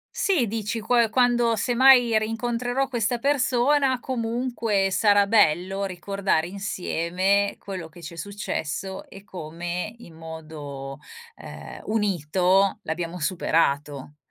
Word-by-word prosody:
Sì, 335 - +2
dici 220 +1 -3
qua 230 +1 +2
quando, 240 -1 +3
semmai, 245 0 +5
rincontrerò 240 +4 -1
questa 240 -1 -1
persona, 270 0 +2
comunque 230 -5 -1
sarà 205 +1 +4
bello 195 -1 +2
ricordare 190 -2 -1
insieme 195 +1 -1
quello 185 -4 -7
che 170 +2 -15
ci 170 +1 -8
è - - -15
successo, 190 -2 -4
e 195 - -12
come 175 +2 -5
in 170 -9 -14
modo, 155 -4 -8 0.4
ehm, - - -10
unito 195 -2 +1
l'abbiamo 165 +2 -4
superato. 150 -4 0
200 Hz, 110 wpm, -24 LUFS, 170-235 Hz, 0.4 s, semmai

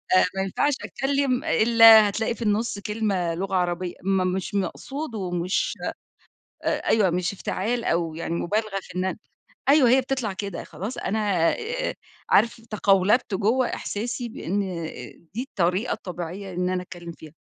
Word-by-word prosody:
آآ 185 - +6
ما 190 - 0
ينفعش 240 +9 +1
أتكلم 275 -1 0
إلّا 225 -1 +7
هتلاقي 220 +3 -1
في - - -14
النص 215 -1 0
كلمة 200 -5 -1
لغة 195 +2 -2
عربية، 180 0 -1
ما 190 0 +2
مش 185 +2 -2
مقصود 245 - -3
ومش 180 -2 -1 0.9
أ - - -3 0.2
أيوه 210 -4 +4
مش 175 +2 -1
افتعال 225 +5 -2
أو 165 -4 0
يعني 165 0 -3
مبالغة 210 +3 -1
فإن 185 +1 -1
أنا 190 - -2 0.5
أيوه 280 -4 +6
هي 260 +2 +5
بتطلع 255 -5 -2
كده، 195 -2 -5
خلاص 210 +7 -6
أنا 200 -6 +1 0.8
عارف 230 +1 +3
تَقَولَبت 210 0 +2
جوّة 225 +7 +2
إحساسي 235 +3 -4
بإن 200 -2 -3 0.7
دي 235 +4 -2
الطريقة 185 +6 0
الطبيعية 180 +2 -6
إن 180 +1 -1
أنا 185 0 -1
أتكلم 175 -1 -9
فيها. 160 -2 -13
200 Hz, 145 wpm, -25 LUFS, 180-230 Hz, 0.9 s, إلّا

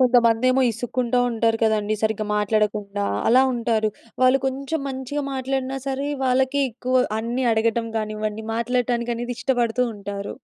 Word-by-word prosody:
కొంతమందేమో 250 +1 +4
ఇసుక్కుంటూ 245 +2 -1
ఉంటారు 225 -1 +1
కదండీ. 215 -1 +2
సరిగ్గా 220 -1 0
మాట్లాడకుండా 210 -1 0 0.2
అలా 255 +3 +6
ఉంటారు. 230 -2 +1 0.3
వాళ్ళు 255 +1 +5
కొంచెం 275 +4 -2
మంచిగా 265 +2 -4
మాట్లాడినా 265 0 -2
సరే 275 +1 -2 0.2
వాళ్ళకి 260 +2 +2
ఎక్కువ 255 +2 +1
అన్ని 240 +3 -2
అడగటం 230 +1 +1
కానివ్వండి 215 0 -3
మాట్లాడటానికి 240 0 0
అనేది 240 +1 -4
ఇష్టపడుతూ 250 -2 +1
ఉంటారు. 200 0 -6
235 Hz, 125 wpm, -23 LUFS, 220-255 Hz, 0.3 s, అలా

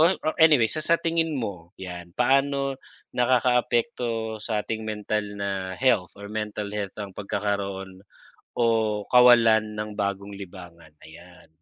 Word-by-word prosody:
oh, 165 - +7 0.2
or 155 - +1
anyway, 150 -8 +6
sa 155 - -2
sa 170 +1 +4
tingin 165 -1 0
mo 100 -9 -5
'yan, 90 -2 -8
paano 135 +1 +2 0.4
nakakaapekto 120 -2 +1
sa 105 -2 -1
ating 110 +1 -4
mental 105 0 -2
na 95 -2 -3
health 115 -8 +2
or 100 0 -8
mental 105 -1 -3
health 105 -2 -4
ang 100 -2 -6
pagkakaroon 100 -2 -3 0.6
o 120 - +2 0.5
kawalan 115 -3 +6
ng 105 0 -4
bagong 100 0 -3
libangan? 90 -4 -11 0.2
Ayan. 85 +2 -15
105 Hz, 135 wpm, -25 LUFS, 100-125 Hz, 0.6 s, oh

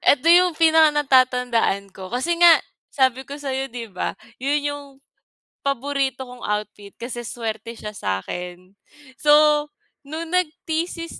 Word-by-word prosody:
eto 285 +3 +3
'yung 355 -1 +5
pinaka-natatandaan 255 - +3
ko, 190 0 -10
kasi 325 +9 -1
nga 345 -1 +8 0.4
sabi 260 -1 +1
ko 280 - -7
sa'yo 270 -2 -3
'di 230 -3 -7
ba, 185 - -3 0.2
'yun 285 +3 0
'yung 290 0 -7 0.8
paborito 275 0 -1
kong 250 -3 -9
outfit 210 -1 -4
kasi 240 0 -6
suwerte 230 -1 -5
siya 210 - -7
sa'kin. 180 - -5 0.4
So, 300 0 +4 0.4
nung 320 +2 -6
nag-thesis 335 -1 -2
265 Hz, 125 wpm, -22 LUFS, 230-300 Hz, 0.8 s, nga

